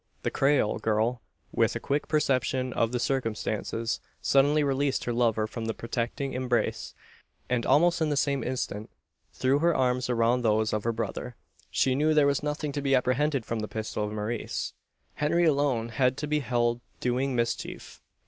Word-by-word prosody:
The - - 0
Creole 135 -6 +2
girl, 110 +3 0 0.3
with - - +1
a - - -1
quick 145 +1 -1
perception 130 -4 +1
of 115 0 +1
the 125 - 0
circumstances, 115 -2 -2 0.2
suddenly 145 +2 +3
released 140 0 0
her 120 - -2
lover 115 -2 +2
from 115 +1 -5
the 110 - -2
protecting 120 +3 -3
embrace; 125 -1 -1 0.6
and, 120 -2 +1
almost 170 +3 +4
in 155 - +2
the 145 - 0
same 140 -3 +1
instant, 110 -4 -3 0.4
threw 130 +2 +1
her 170 +1 +3
arms 125 -1 +1
around 120 +1 +2
those 110 -1 +2
of 105 0 -1
her 115 - +2
brother. 115 +2 -4 0.3
She 130 - +2
knew 155 +3 +2
there 150 -2 +5
was 140 -1 +2
nothing 150 0 -2
to 145 0 -3
be 135 -1 +3
apprehended 130 +1 +1
from 115 - -2
the 110 - -3
pistol 110 -1 -3
of 105 - -3
Maurice. 110 +2 -3 0.4
Henry 170 +4 +2
alone 140 -6 +1
had 125 +3 +1
to 150 - -3
be 150 0 +1
held 120 -2 0 0.2
doing 125 +2 0
mischief. 120 -1 -3
125 Hz, 175 wpm, -28 LUFS, 115-140 Hz, 0.6 s, there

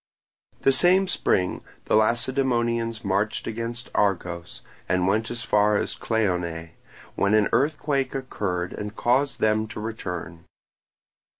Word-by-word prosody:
The 135 - +5
same 185 +6 +4
spring 90 - 0 0.2
the - - +2
Lacedaemonians 115 -1 +1
marched 100 +2 0
against 115 +2 -5
Argos, 90 -4 -1 0.3
and 90 0 +2
went 110 +3 +1
as 120 -1 -4
far 105 -1 +3
as - - -1
Cleonae, 90 -7 -1 0.4
when 100 +2 +2
an 105 -1 +3
earthquake 140 +1 +1
occurred 95 -9 -3
and 105 +1 -6
caused 135 +5 +1
them 110 0 +2
to 105 - -7
return. 90 -7 -6
110 Hz, 120 wpm, -25 LUFS, 95-120 Hz, 0.4 s, The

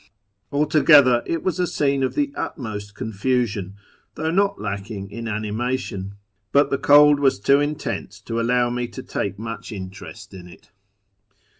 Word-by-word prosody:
Altogether, 145 -4 +5
it 165 -1 -2
was 185 -1 -1
a 180 - +1
scene 140 -3 0
of 130 - -1
the 290 -1 0
utmost 105 -6 -5
confusion, 110 -4 -2 0.4
though 160 +1 -2
not 200 +3 +1
lacking 100 -1 -5
in 115 +2 -6
animation; 110 -2 -3 0.4
but 140 +1 +3
the 140 - 0
cold 145 0 +6
was 135 -7 +2
too 140 +7 +4
intense 145 -9 -3
to 115 +3 -3
allow 120 +1 +2
me 120 0 -2
to - - -9
take 100 -1 -3
much 115 +2 -7
interest 100 +1 -9
in 90 -2 -10
it. 90 - -17
120 Hz, 150 wpm, -22 LUFS, 105-145 Hz, 0.4 s, cold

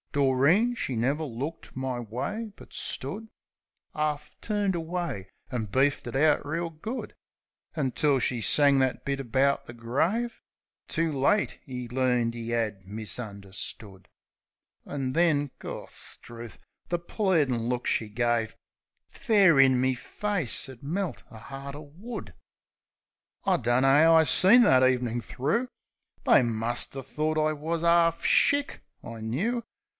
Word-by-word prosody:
Doreen 145 - +3
she 130 - -3
never 140 +7 0
looked 145 +4 -6
my 130 -2 -2
way; 130 - -4
but - - -15
stood 210 +12 -3 0.6
'Arf 150 -1 -2
turned 205 -3 0
away, 165 - -4 0.2
an' 120 -4 -2
beefed 135 +8 +1
it - - -6
out 150 +1 +3
reel 165 +3 -2
good, 215 +11 -6 0.6
Until 140 -1 +1
she 120 -1 0
sang 140 +6 +4
that 130 -1 0
bit 140 0 -1
about 135 +3 +1
the 120 - -8
grave; 165 - -1 0.5
"Too 165 0 0
late 145 +10 +1
'e 125 -1 -5
learned 125 -2 0
'e 115 0 -5
'ad 110 -5 -2
misunderstood!" 100 -2 -6 0.8
An' 135 -3 -3
then 150 -4 +2
— - - -47
Gorstrooth! 120 -1 -8 0.3
The 175 - 0
pleadin' 155 - 0
look 125 0 -2
she 110 - 0
gave 115 0 0 0.5
Fair 195 -9 +4
in 130 -2 +5
me 130 +1 +2
face 180 - -2
'ud 130 -3 -12
melt 175 +4 -3
a 110 +4 -12
'eart 140 +1 -7
o' 145 -1 -11
wood. 220 +3 -7 1.1
I - - +3
dunno 120 +3 +2
'ow 155 +4 +6
I 160 - +7
seen 225 +10 +6
that 130 - +5
evenin' 125 -2 +1
thro'. 155 - -1 0.6
They - - +6
muster 120 +3 -2
thort 155 +4 -2
I 155 0 +2
wus 160 +3 -3
'arf 170 0 +3
shick, 285 0 +3 0.2
I 115 -1 -8
knoo. 200 - -1
140 Hz, 135 wpm, -27 LUFS, 120-165 Hz, 1.1 s, I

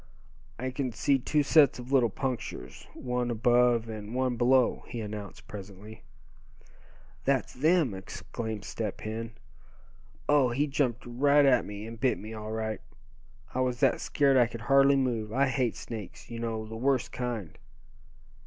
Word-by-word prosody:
"I 130 +2 -3
can 130 -1 -2
see 135 +4 +2
two 150 +4 +1
sets 145 -1 +5
of 125 +1 -9
little 125 -4 +4
punctures, 115 - -5
one 125 -1 -2
above 120 0 +3
and 110 +1 -6
one 130 -1 +1
below," 125 +1 +3
he 120 - -5
announced 105 -2 -7
presently. 105 +2 -10 1.2
"That's 135 -2 +1
them!" 155 - +2
exclaimed 105 +2 -6
Step 110 -4 -4
Hen. 115 +1 -5 0.9
"Oh! 145 -4 +4
he 135 +5 +1
jumped 135 -5 -1
right 140 +4 +4
at 135 -2 +4
me, 105 +1 -7
and 115 0 -9
bit 130 +1 +2
me, 110 +2 -8
all 110 0 -6
right! 110 -1 -3 0.7
I 130 - -2
was 125 -1 0
that 135 -3 +3
scared 140 -2 +3
I 120 -2 +5
could 115 -1 -8
hardly 135 +4 +5
move. 120 -5 0
I 135 +4 +3
hate 130 -3 0
snakes, 110 -1 -8
you 115 - -5
know, 115 -1 -3
the 110 +1 -8
worst 130 +1 +1
kind. 115 - -4
120 Hz, 155 wpm, -29 LUFS, 110-130 Hz, 1.2 s, sets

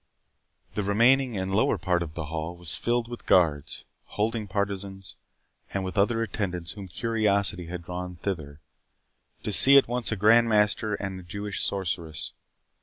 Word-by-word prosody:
The 105 - -2
remaining 120 +4 +3
and 95 0 -3
lower 105 - +2
part 90 -3 0
of 80 -2 -6
the 85 - -4
hall 80 +2 -5
was 85 -3 -1
filled 120 0 -1
with 120 0 -9
guards, 80 -6 +2 0.2
holding 110 0 -2
partisans, 100 -1 -4 0.6
and 95 - -1
with 95 - -5
other 115 +3 +2
attendants 90 -6 -4
whom 100 0 -9
curiosity 100 -4 0
had 90 0 -6
drawn 90 +1 -6
thither, 80 -6 -5 0.8
to - - -3
see 135 +7 +9
at 135 - +5
once 120 0 -1
a - - 0
Grand 115 +3 +4
Master 105 0 +2
and 95 -2 -5
a - - -11
Jewish 100 +3 -5
sorceress. 85 -5 -3
100 Hz, 160 wpm, -26 LUFS, 90-110 Hz, 0.8 s, see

